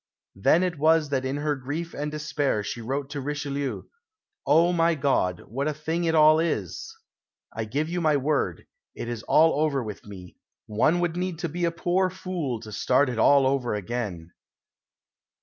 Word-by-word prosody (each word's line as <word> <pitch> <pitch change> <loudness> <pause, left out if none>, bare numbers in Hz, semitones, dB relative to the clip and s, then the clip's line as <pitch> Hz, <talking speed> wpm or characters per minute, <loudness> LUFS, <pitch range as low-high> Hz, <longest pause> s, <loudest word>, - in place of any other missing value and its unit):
Then 155 - +3
it 175 -5 -2
was 160 0 +3
that 135 -2 -1
in 135 +2 -2
her 150 0 0
grief 145 +6 -5
and 145 +1 -3
despair 150 -7 -1
she 110 +3 -5
wrote 135 +4 -3
to 145 -1 -4
Richelieu, 140 -1 -3 0.6
"Oh, 165 +5 +4
my 165 -1 +3
God! 130 - 0
what 135 +7 -3
a 155 - -1
thing 160 +3 -2
it 165 0 +1
all 155 0 +6
is! 130 - -2 0.6
I 110 - -3
give 140 +8 -2
you 175 +1 -2
my 155 -3 +3
word, 140 - -1 0.3
it - - -6
is 120 -2 -4
all 155 +4 +4
over 140 -4 0
with 105 -2 -7
me! 90 -3 -11 0.3
One 150 +11 +2
would 175 -1 -1
need 180 -1 -2
to - - -2
be 175 +3 -2
a 170 - +1
poor 180 +3 +1
fool 180 -9 -4
to 110 -2 -10
start 130 +6 +2
it 120 -2 -3
all 140 +3 +5
over 130 -4 0
again." 100 -5 -4
145 Hz, 185 wpm, -26 LUFS, 120-160 Hz, 0.6 s, all